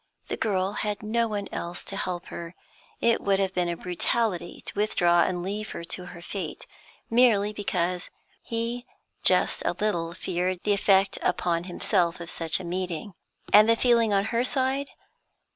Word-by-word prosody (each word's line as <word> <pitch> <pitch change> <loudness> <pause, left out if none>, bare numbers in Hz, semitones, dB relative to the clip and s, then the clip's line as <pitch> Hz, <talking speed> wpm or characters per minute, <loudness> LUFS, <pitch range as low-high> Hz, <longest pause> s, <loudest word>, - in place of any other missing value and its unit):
The - - -1
girl 195 -3 0
had 210 0 -2
no 230 +2 +1
one 205 -2 -3
else 175 +2 -5
to 195 - -3
help 180 -2 -3
her; 170 +1 -7 0.5
it 235 -1 +3
would 195 -1 +2
have 190 -1 0
been 175 -2 0
brutality 180 +1 -1
to - - -3
withdraw 175 -5 +3
and 175 +1 0
leave 210 +3 -3
her - - -6
to 180 +1 -4
her 175 -1 -10
fate, 180 -6 -5 0.5
merely 220 -4 +4
because 180 -3 -2 0.3
he 235 +2 -3 0.3
just - - +3
a - - +1
little 170 -5 -1
feared 180 0 -2
the 210 - +3
effect 195 -1 +3
upon 170 -1 0
himself 175 -1 0
of 170 -1 -5
such 165 +1 +1
a - - -7
meeting. 180 +2 -3 0.4
And 215 +2 +8
the 230 - +6
feeling 235 -2 +3
on 200 0 +2
her 235 +1 +2
side? 265 +2 +1
195 Hz, 165 wpm, -26 LUFS, 175-215 Hz, 0.5 s, And